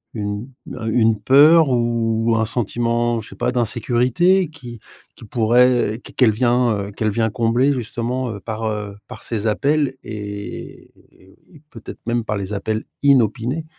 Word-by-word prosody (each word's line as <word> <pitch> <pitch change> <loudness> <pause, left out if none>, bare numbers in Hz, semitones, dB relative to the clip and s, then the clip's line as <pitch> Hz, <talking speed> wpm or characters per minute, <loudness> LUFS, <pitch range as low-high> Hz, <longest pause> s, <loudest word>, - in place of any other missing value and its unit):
une 105 +2 -4 0.3
un 115 - -6
une 110 -1 +2
peur 145 +7 +6
ou 115 -2 +1
un 110 - +1
sentiment, 120 +1 -1
je - - -13
sais - - -12
pas, 120 +1 -1
d'insécurité 125 - +1
qui 120 -7 -11 0.4
qui - - -13
pourrait 120 0 +2
qu - - -11
qu'elle 125 -4 +4
vient, 120 +1 +2 0.2
heu, - - -9
qu'elle 110 +1 -1
vient 110 +1 0
combler 120 +5 +2
justement 120 -1 -3
par, 110 +2 -5
heu, 105 -2 -4
par - - -11
ses 110 -1 -2
appels 140 +4 +1
et 105 -1 -8 0.8
peut-être 115 -3 -10
même 120 0 -1
par 105 -1 -3
les 100 +1 -5
appels 110 +2 -2 0.2
inopinés? 130 +2 +2
115 Hz, 150 wpm, -20 LUFS, 110-125 Hz, 0.8 s, peur